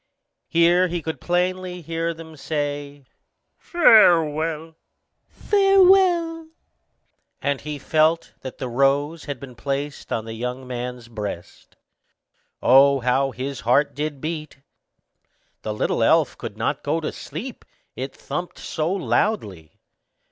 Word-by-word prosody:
Here 175 +2 +4
he 175 0 -3
could 160 - -5
plainly 180 0 -1
hear 165 +1 -2
them 160 -1 -11
say, 145 -2 -4 0.5
"Farewell, 165 - +4 0.6
farewell;" 375 -5 +3 0.9
and 140 -1 -1
he 150 0 -5
felt 155 +3 +1
that 130 - -8
the 130 - -4
rose 140 +5 +1
had 140 -3 -5
been 135 -1 -10
placed 140 +3 -4
on 110 - -2
the 110 - -6
young 125 +3 -5
man's 125 -1 -6
breast. 105 -6 -8 0.9
Oh, 135 +1 +6
how 130 +3 +1
his 130 +3 -5
heart 125 +5 +2
did 145 -1 -4
beat! 155 -2 -6 1.0
The 110 - -4
little 105 - -1
elf - - +3
could - - -8
not - - -1
go 165 - -1
to 155 - -3
sleep, 210 - -8 0.3
it 130 +1 -5
thumped 175 +5 -5
so 160 +1 -3
loudly. 175 - -1
150 Hz, 120 wpm, -23 LUFS, 135-175 Hz, 1.0 s, Oh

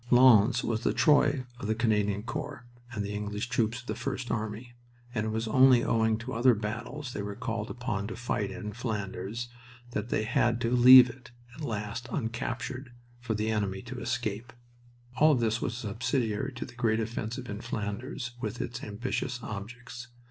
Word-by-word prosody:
Lens 120 -2 +6
was 115 -1 -1
the - - +1
Troy 145 -3 +4
of - - -4
the 110 - +1
Canadian 105 -3 +1
Corps 115 0 -5 0.3
and 105 -4 -3
the 100 - -4
English 105 +2 -3
troops 115 +1 0
of - - -20
the - - -2
First 130 -2 -4
Army, 110 +2 -3 0.4
and 110 -2 -1
it - - 0
was 110 +1 -2
only 130 +1 +6
owing 110 -1 +2
to 120 +3 -6
other 120 +1 +5
battles 120 +6 -5
they 105 - -3
were 100 0 -5
called 115 -2 -3
upon 115 -5 -3
to 115 - -5
fight 105 -4 -2
in 105 -1 -6
Flanders 110 0 -4 0.4
that 110 0 -3
they 110 - +1
had 115 +1 +2
to 115 - 0
leave 125 +1 +10
it 125 +1 -11 0.2
at 155 - -11
last 115 -2 -4
uncaptured, 120 +1 -3 0.3
for 115 -2 -2
the 110 +1 0
enemy 100 -3 -1
to 125 +1 -7
escape. 120 -1 -3 0.7
All 155 +1 +6
this 115 -2 0
was 120 - -2
subsidiary 120 +2 -1
to 125 - -5
the - - -12
great 115 -2 +1
offensive 115 +2 -4
in 105 0 -5
Flanders, 115 +3 -4
with 110 +2 -3
its 120 +1 -4
ambitious 125 +3 -3
objects. 120 +4 -7
115 Hz, 175 wpm, -29 LUFS, 105-125 Hz, 0.7 s, leave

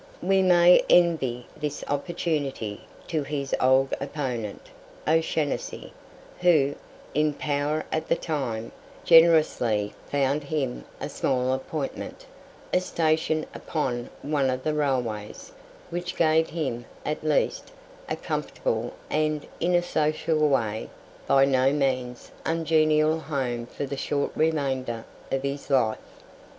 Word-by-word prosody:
We 190 +1 +3
may 180 -1 +7
envy 135 -9 +3
this 150 -1 -4
opportunity 145 - -2 0.2
to 160 -3 -1
his 140 -1 -4
old 130 +1 +4
opponent, 125 -7 -4 0.4
O'Shanassy, 160 -2 0 0.5
who, 155 -6 +4 0.4
in 150 +1 +2
power 150 +1 -1
at 160 - -2
the - - +4
time, 125 -8 -3 0.3
generously 155 -11 +5 0.2
found 140 +1 +1
him 140 -4 -2
a - - -3
small 130 -3 0
appointment 135 +2 -5 0.5
a - - +5
station 160 -3 0
upon 125 -6 -3
one 140 -2 +1
of 130 0 -2
the 155 - 0
railways 125 -8 -2 0.4
which 175 +1 -3
gave 160 0 +3
him, 130 -8 -3 0.2
at 150 +1 -2
least, 155 -1 0 0.4
a - - 0
comfortable, - - -2 0.2
and, 155 -1 0
in 175 +1 +2
a 175 - +3
social 155 -2 +1
way, 110 -5 0 0.4
by 135 0 +5
no 135 0 +3
means 130 -4 -1
ungenial 155 -1 +2
home 125 -6 -3
for 140 - -5
the 140 0 -5
short 140 +1 -1
remainder 135 -7 0 0.3
of 135 0 0
his 140 +1 -4
life. 125 -6 +2
145 Hz, 120 wpm, -26 LUFS, 130-155 Hz, 0.5 s, may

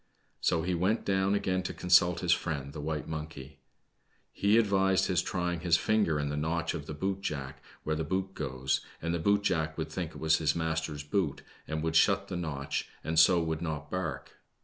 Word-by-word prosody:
So 80 -1 +1
he 90 +1 0
went 95 +6 +1
down 95 0 +2
again 95 -2 0
to 90 - -5
consult 90 -1 +4
his 90 -2 +1
friend, 70 -5 -1
the 75 - -6
white 75 0 -3
monkey. 75 -3 -7 0.7
He 100 +2 +3
advised 95 -3 +3
his 90 -2 +2
try 90 -1 -1
ing 85 - -4
his 85 0 +3
finger 105 -8 +2
in 75 0 -1
the 75 - -2
notch 80 +2 -1
of 75 - -6
the 75 - -5
boot 95 +5 -2
jack 70 -5 -4 0.2
where 80 - -1
the 80 - -1
boot 95 +4 -2
goes, 65 -5 -1 0.2
and 85 +1 -2
the 85 - -1
boot 100 +4 +2
jack 80 -5 0
would - - -3
think - - -4
it - - -10
was 80 0 +3
his 75 -2 +1
master's 80 -2 -2
boot 75 -1 -1 0.2
and 80 0 -3
would 80 0 -1
shut - - +4
the - - -3
notch, 75 -6 -3
and 80 0 +1
so 85 +1 +6
would 80 0 -2
not 80 -4 -4
bark. 95 0 -3
80 Hz, 210 wpm, -30 LUFS, 75-95 Hz, 0.7 s, so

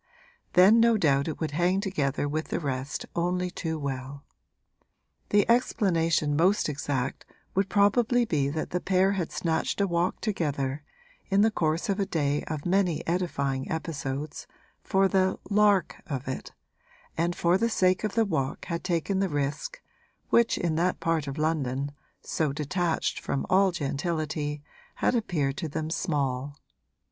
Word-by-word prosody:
Then 195 +5 +7
no 230 -1 +5
doubt 140 -6 +2
it 160 - -4
would 160 -3 -2
hang 175 +5 +2
together 150 -8 -1
with 155 +2 -2
the - - -2
rest 135 -2 -3
only 180 +1 0
too 160 -2 -3
well. 140 -1 -5 1.1
The 205 -1 +3
explanation 165 -10 +2
most 185 +7 +3
exact 140 -3 -2 0.3
would 195 +1 +1
probably 230 +5 +3
be 145 -9 0
that 155 +2 -3
the 180 - 0
pair 190 +1 +3
had 185 -5 -2
snatched 165 +3 -1
a 200 - +3
walk 175 -1 0
together 145 - -2 0.5
(in 195 +1 +4
the 220 +1 +4
course 165 +1 0
of 200 0 0
a 195 - 0
day 145 -2 0
of 155 -2 -4
many 180 -3 +1
edifying 140 -7 -1
episodes) 150 -2 -4 0.3
for 195 0 +2
the 190 -1 +2
'lark' 205 -2 +3
of 135 -5 -4
it, 130 - -5 0.6
and 170 +2 0
for 175 +2 +2
the 230 - +2
sake 185 -3 +2
of 215 - -2
the 225 -1 +3
walk 140 -9 -2
had 170 -1 -3
taken 185 +2 0
the 195 -1 +1
risk, 150 - -3 0.5
which 235 0 +4
in 165 -2 0
that 180 +2 +1
part 165 -3 0
of 140 +2 -5
London, 145 -3 -1 0.3
so 155 -3 -1
detached 160 +4 -1
from 140 - -2
all 190 0 +5
gentility, 150 -1 -2 0.3
had - - +1
appeared 155 - 0
to 165 -4 -3
them 155 +2 -3
small. 140 -4 -1
165 Hz, 155 wpm, -27 LUFS, 145-190 Hz, 1.1 s, Then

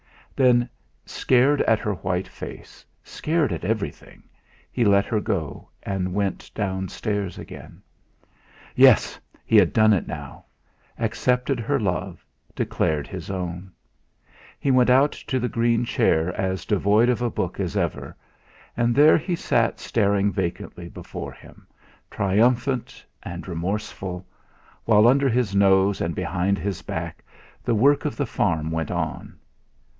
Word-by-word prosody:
Then, 125 -2 +4 0.4
scared 130 +3 +2
at 110 - +3
her 105 0 -2
white 90 0 -2
face, - - -10 0.2
scared 155 - -1
at 80 - -5
everything, 100 -6 -4 0.5
he 125 - 0
let 100 -2 +4
her 110 - 0
go, 95 - -4
and 95 -2 -3
went 100 -2 -2
downstairs 100 0 -3
again. - - -11 0.9
Yes! - - +5 0.3
He - - +4
had - - +5
done 110 -1 +5
it 95 - -1
now! 70 -4 -8 0.5
Accepted 125 +4 0
her 135 +5 0
love, 90 -3 -3 0.3
declared 75 -2 -1
his 90 -2 -8
own! 90 0 -5 0.9
He 140 - +1
went 125 -1 +4
out 135 +4 +5
to 130 - -3
the 125 - -1
green 115 0 +1
chair 80 -5 +1
as 95 -2 -2
devoid 105 +2 +3
of 125 -1 +1
a 120 - +1
book - - -3
as - - -2
ever; - - -3 0.6
and 120 0 +1
there 150 +4 +6
he 175 +3 -2
sat 115 -8 0
staring 100 -2 +1
vacantly 85 -1 -4
before - - -8
him, - - -17 0.4
triumphant 120 +6 0 0.2
and 85 +2 -7
remorseful, 95 +1 -4 0.6
while 110 0 +5
under 135 +2 +4
his 120 -4 0
nose 95 0 +3
and 85 -1 -2
behind 90 +2 0
his 95 +1 -4
back - - -6 0.4
the 120 - +1
work 140 +7 +4
of - - -2
the - - 0
farm 80 -1 -1
went 80 -2 -2
on. - - -4
105 Hz, 140 wpm, -23 LUFS, 95-120 Hz, 0.9 s, there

